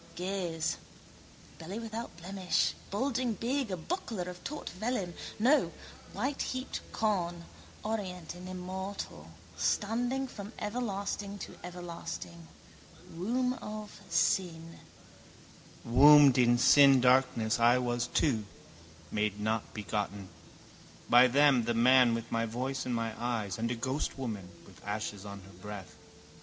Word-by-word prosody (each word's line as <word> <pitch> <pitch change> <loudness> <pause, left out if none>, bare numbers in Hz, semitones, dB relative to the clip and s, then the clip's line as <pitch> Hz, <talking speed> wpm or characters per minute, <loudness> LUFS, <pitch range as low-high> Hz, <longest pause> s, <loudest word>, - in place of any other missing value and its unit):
Gaze. 180 -3 -2 0.8
Belly 180 +6 -6
without 225 -3 -6
blemish, 185 +1 0 0.2
bulging 250 +2 0
big, 255 +2 -1
a 185 - -2
buckler 225 - -3
of 180 0 -8
taut 300 +1 -5
vellum, 200 -2 -2 0.2
no, 260 +8 +4 0.4
whiteheaped 265 -1 -2
corn, 175 -6 -1 0.4
orient 190 -7 -4
and 180 +1 -9
immortal, 185 - -6 0.3
standing 245 +5 0
from 210 -2 -9
everlasting 205 -2 -3
to - - -8
everlasting. 95 - -7 0.7
Womb 245 +9 0
of 210 -1 -7
sin. 165 0 0 1.1
Wombed 140 +2 +8
in 120 -1 +5
sin 135 +2 +7
darkness 125 -3 +3
I 120 +2 +5
was 120 -1 -1
too, 115 -9 +1 0.7
made 105 -1 -1
not 110 +1 -1
begotten. 100 -1 -4 0.8
By 125 +2 +8
them, 135 -2 +4
the 120 0 0
man 125 0 +6
with 115 0 -6
my 115 0 0
voice 130 +4 -3
and 125 - 0
my 115 -1 -2
eyes 110 -5 -2
and 115 +1 0
a 120 - -1
ghostwoman 120 -5 -3 0.2
with - - -17
ashes 105 -1 -4
on 100 -1 -8
her 95 +1 -15
breath. 105 -3 -8
160 Hz, 120 wpm, -31 LUFS, -, 1.1 s, Wombed